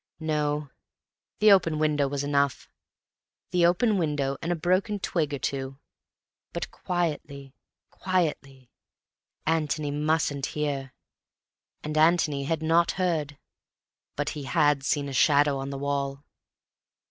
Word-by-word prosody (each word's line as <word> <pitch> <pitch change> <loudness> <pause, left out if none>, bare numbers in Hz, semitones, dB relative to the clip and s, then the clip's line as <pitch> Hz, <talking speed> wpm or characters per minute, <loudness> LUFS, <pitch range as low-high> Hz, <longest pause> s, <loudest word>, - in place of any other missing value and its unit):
No, 150 -2 -1 0.7
the 215 0 +6
open 165 -5 +4
window 150 -2 +1
was 140 0 -3
enough; 140 -1 0 0.8
the 175 -1 +4
open 200 +4 +2
window 145 -4 0
and 170 - -2
a - - +1
broken 185 +5 +1
twig 165 -6 -1
or 140 - -2
two. 135 +1 -3 0.8
But - - -4
quietly, 150 -6 -3 0.4
quietly. 145 -9 -2 0.7
Antony 155 -2 0
mustn't 150 -2 0
hear. 140 -3 -2 0.9
And 155 0 -4
Antony 155 -4 +3
had 160 +1 -1
not 165 +2 +3
heard.... 160 -6 -1 0.8
But 145 0 -1
he 145 -3 -6
had 145 +1 +2
seen 145 0 0
a 140 - -6
shadow 145 0 +4
on 135 0 -4
the 140 - -5
wall. 140 0 -2
150 Hz, 125 wpm, -27 LUFS, 140-165 Hz, 0.9 s, the